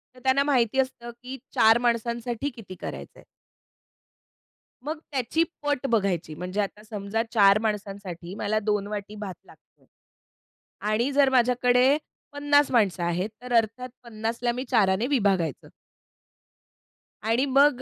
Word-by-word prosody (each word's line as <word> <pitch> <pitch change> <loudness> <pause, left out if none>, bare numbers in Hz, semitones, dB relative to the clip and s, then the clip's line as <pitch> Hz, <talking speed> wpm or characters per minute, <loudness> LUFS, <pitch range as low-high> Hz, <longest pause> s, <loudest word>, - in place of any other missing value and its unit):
तर - - -15
त्यांना 265 +1 +3
माहिती 265 -3 +2
असतं, 250 -2 -2
की 260 +2 -6 0.2
4 225 +1 +6
माणसांसाठी 235 +3 -1
किती 200 -5 -10
करायचंय? - - -8 1.6
मग 305 +2 -4
त्याची 275 +5 +1 0.2
पट 290 -2 -1
बघायची, 195 -8 0
म्हणजे 185 +5 -3
आता 210 +1 -5
समजा 215 0 -3
4 200 -2 +6
माणसांसाठी 195 -4 -4
मला 215 +1 0
2 210 -1 -1
वाटी 210 0 -6
भात 205 -3 -6
लागतोय - - -22 1.1
आणि 235 +6 +1
जर 280 -1 +4
माझ्याकडे 250 +2 +3 0.3
50 290 0 +2
माणसं 200 -7 +2
आहेत, 175 +4 -1
तर 250 0 -5
अर्थात 230 +3 -1
50 225 0 -4
ला 240 - +2
मी 250 +2 -4
4 200 -6 +3
ने 240 - 0
विभागायचं. 195 - 0 1.6
आणि 230 +5 +2
मग, 275 -1 +4
230 Hz, 130 wpm, -26 LUFS, 205-255 Hz, 1.6 s, 4